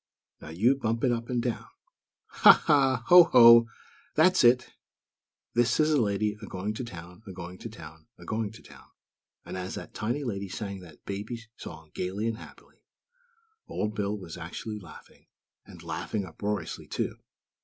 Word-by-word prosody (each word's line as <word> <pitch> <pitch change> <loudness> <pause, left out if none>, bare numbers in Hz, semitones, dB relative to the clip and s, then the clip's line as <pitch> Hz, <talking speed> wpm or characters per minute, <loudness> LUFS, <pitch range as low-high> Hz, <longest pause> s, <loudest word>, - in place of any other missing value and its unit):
Now - - -10
you 110 +12 +2
bump 115 -3 -2
it 130 - +3
up 115 0 -3
and 120 -2 -1
down. 120 -2 -3 0.6
Ha, - - +7
ha! 135 -4 +3
Ho, 175 -1 +10
ho! 115 -4 +8 0.5
That's 170 +2 +4
it! 120 +1 +4 0.8
This 120 +4 +2
is 155 0 +3
a 145 -4 +3
lady, 105 0 0
a 105 - -8
going 95 +3 -4
to 110 - -5
town, 90 -3 -10
a - - -7
going 90 0 -9
to 115 - -7
town, 80 -6 -13
a 85 - -13
going 110 +1 -2
to - - -14
town!" - - -16 0.6
and - - -7
as 95 0 -5
that - - -8
tiny 120 +7 -2
lady 100 -6 -4
sang 100 -1 -5
that 85 -5 -15
baby 105 +4 -5
song 80 -1 -11
gaily 95 +4 -3
and 115 -1 -2
happily, - - -15 0.9
Old 105 0 -3
Bill 105 -1 -2
was 90 -5 -9
actually 105 -1 -6
laughing; 95 - -15 0.4
and - - -13
laughing 105 -3 -3
uproariously, 100 +4 -4
too! - - -3
105 Hz, 170 wpm, -28 LUFS, 95-120 Hz, 0.9 s, Ho